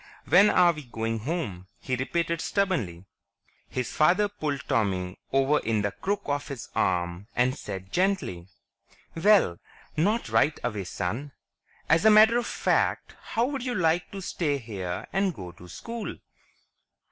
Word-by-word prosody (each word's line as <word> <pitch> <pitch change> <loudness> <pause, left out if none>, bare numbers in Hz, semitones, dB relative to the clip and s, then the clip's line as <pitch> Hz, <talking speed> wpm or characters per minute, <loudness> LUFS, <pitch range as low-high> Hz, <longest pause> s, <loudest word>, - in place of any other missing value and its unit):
"When 205 +2 +7
are 175 -1 +5
we 150 -3 -9
going 115 -1 -3
home?" 110 - -4
he 130 - -2
repeated 170 +5 -1
stubbornly. 120 - -1 0.6
His 125 -1 -3
father 185 +7 +4
pulled 150 -10 -4
Tommy 95 -3 0
over 135 +2 +3
in 110 -2 0
the 100 - 0
crook 200 - -2
of 145 0 -2
his 140 -5 -7
arm 90 +1 0
and 125 +2 +2
said 95 -1 -7
gently, 180 - 0 0.7
"Well, 170 - +4 0.4
not 205 +4 +1
right 115 +7 +2
away, 105 -5 -2
son. 110 +11 -4 0.5
As 165 +1 +4
a 220 - +7
matter 220 +2 +7
of 240 - -4
fact, - - 0
how 230 +2 0
would 275 -1 -3
you 250 -1 -2
like 170 0 +1
to 195 -1 -7
stay 150 -5 -1
here 95 -8 -5
and 195 -3 +1
go 90 -2 -8
to 90 - -14
school?" 230 - -6
145 Hz, 150 wpm, -27 LUFS, -, 0.7 s, When